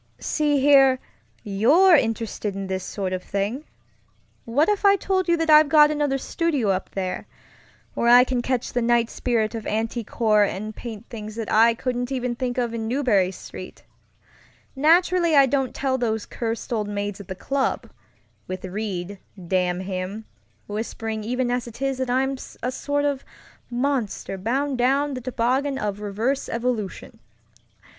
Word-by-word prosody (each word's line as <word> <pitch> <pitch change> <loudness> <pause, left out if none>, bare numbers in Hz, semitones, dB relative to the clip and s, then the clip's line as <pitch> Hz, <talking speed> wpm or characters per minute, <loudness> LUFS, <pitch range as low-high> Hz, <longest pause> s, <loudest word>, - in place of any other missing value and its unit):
"See 295 -2 0
here, 270 -1 +6 0.5
you're 270 - +5
interested 225 -5 -1
in 195 0 -4
this 190 -1 -3
sort 190 -2 -4
of 185 - -2
thing. 205 +11 -3 0.8
What 280 +8 +2
if 415 -1 0
I 400 0 +6
told 375 -1 -1
you 340 0 +3
that 325 -1 +1
I've 305 -1 +7
got 300 -1 +6
another 295 -2 0
studio 285 - -1
up 190 0 -2
there, 185 -2 -3 0.7
where 235 - 0
I 245 +1 +8
can 250 -1 -1
catch 255 0 -2
the 245 - +1
night 235 0 +2
spirit 230 -3 0
of 225 -2 -5
antique 225 +1 -2
horror 215 -3 +3
and 215 +2 -5
paint 225 -2 -8
things 215 -2 -7
that 225 -1 -4
I 230 +1 +5
couldn't 245 +1 -3
even 250 -2 -1
think 245 0 -3
of 240 -2 -1
in 225 -1 -3
Marlborough 235 -8 +2
Street? 190 - -10 0.9
Naturally 340 +3 +3
I 275 -1 +7
don't 270 -1 -1
tell 260 -1 0
those 220 -3 -1
cursed 230 +2 -4
old 215 -2 -1
maids 205 -1 -3
at 195 - -13
the 185 - -5
clubŌĆöwith 190 -6 -5
Reid, 200 -2 -4 0.3
damn 180 0 0
him, 190 +3 -5 0.4
whispering 220 +1 -4
even 245 +2 -1
as 245 -1 -1
it 235 0 -11
is 270 -1 -1
that 260 -1 -2
I'm 265 +2 +1 0.3
a 250 - 0
sort 285 +2 -1
of 280 -2 -1 0.5
monster 245 -6 -2
bound 260 +6 -1
down 275 +3 +2
the 255 - -5
toboggan 255 +3 0
of 205 -5 -3
reverse 215 +7 -2
evolution. 230 -4 -3
240 Hz, 160 wpm, -23 LUFS, 210-275 Hz, 0.9 s, I